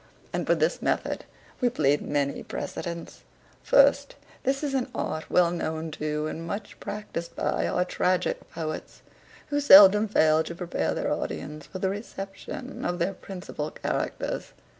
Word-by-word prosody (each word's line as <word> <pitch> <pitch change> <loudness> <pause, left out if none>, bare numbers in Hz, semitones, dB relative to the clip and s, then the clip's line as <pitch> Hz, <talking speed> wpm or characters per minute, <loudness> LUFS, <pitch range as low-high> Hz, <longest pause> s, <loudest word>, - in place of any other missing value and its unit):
And - - -2
for - - +4
this - - +1
method - - -1 0.3
we 250 - +3
plead 145 - +2
many 140 -1 -1
precedents. 170 -1 -6 0.4
First, - - +4 0.3
this 270 +2 0
is 285 -2 -1
an 260 -2 0
art 155 0 -3
well 175 -1 +4
known 160 -2 -3
to, 150 0 -2
and 160 +1 -4
much 200 +5 -6
practised 205 -5 -5
by, - - 0
our 180 - +1
tragick 180 0 0
poets, 155 -1 -6 0.5
who 290 - +1
seldom 210 -5 +9
fail 155 -6 +4
to 170 - -6
prepare 175 0 -2
their - - 0
audience 150 0 -5
for - - -7
the 190 0 0
reception 205 +6 -7
of 175 0 -1
their 180 +3 0
principal 180 -5 -6
characters. - - -3
180 Hz, 150 wpm, -27 LUFS, 155-210 Hz, 0.5 s, seldom